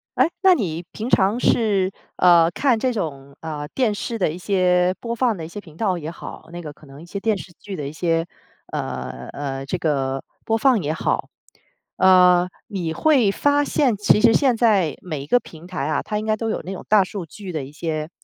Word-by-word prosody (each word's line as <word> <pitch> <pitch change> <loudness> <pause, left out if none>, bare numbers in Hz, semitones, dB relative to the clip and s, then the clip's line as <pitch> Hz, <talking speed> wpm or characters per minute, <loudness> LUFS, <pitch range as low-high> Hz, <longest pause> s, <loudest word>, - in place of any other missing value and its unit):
诶， 265 +7 +3
那 375 -2 +6
你 170 - -3
平 225 +3 -5
常 200 +5 +3
是， 200 -6 +2 0.2
呃， 170 -2 +6
看 245 +1 +2
这 255 +1 +1
种， 140 - -5
呃， 150 -2 -5
电 245 -6 +2
视 230 +3 -4
的 180 -6 +1
一 - - -6
些 180 -1 +2
播 235 0 -4
放 235 -5 +1
的 160 - -6
一 - - -7
些 205 +4 -8
频 160 -4 -16
道 195 -5 +1
也 160 -1 -5
好， 170 - -10
那 175 - -7
个 150 -3 -7
可 145 - -18
能 135 +1 -13
一 - - -11
些 200 +3 -5
电 215 0 +1
视 175 - -10
剧 200 -2 -7
的 145 -2 -4
一 145 - -7
些， 165 0 0 0.5
呃 65 0 -5
呃， 135 -1 -4
这 - - -1
个 135 -3 -1 0.2
播 225 0 +1
放 250 -4 +3
也 150 0 -1
好， 160 - -1 0.7
呃， 180 -1 +6 0.2
你 175 -5 -3
会 260 - +3
发 290 +5 +2
现 265 -5 +1
其 210 +1 +3
实 225 0 +5
现 260 -5 +3
在 200 - +2
每 155 -6 -4
一 140 - -9
个 245 - +4
平 165 -3 -13
台 180 -7 -3
啊， 155 - 0
它 210 - -3
应 215 - -5
该 215 0 +2
都 225 +1 -3
有 - - -2
那 190 - -5
种 - - -8
大 210 -2 +6
数 185 0 -6
据 190 +3 -9
的 155 -4 -3
一 135 - -10
些， 155 0 -4
185 Hz, 240 characters per minute, -22 LUFS, 155-220 Hz, 0.7 s, 那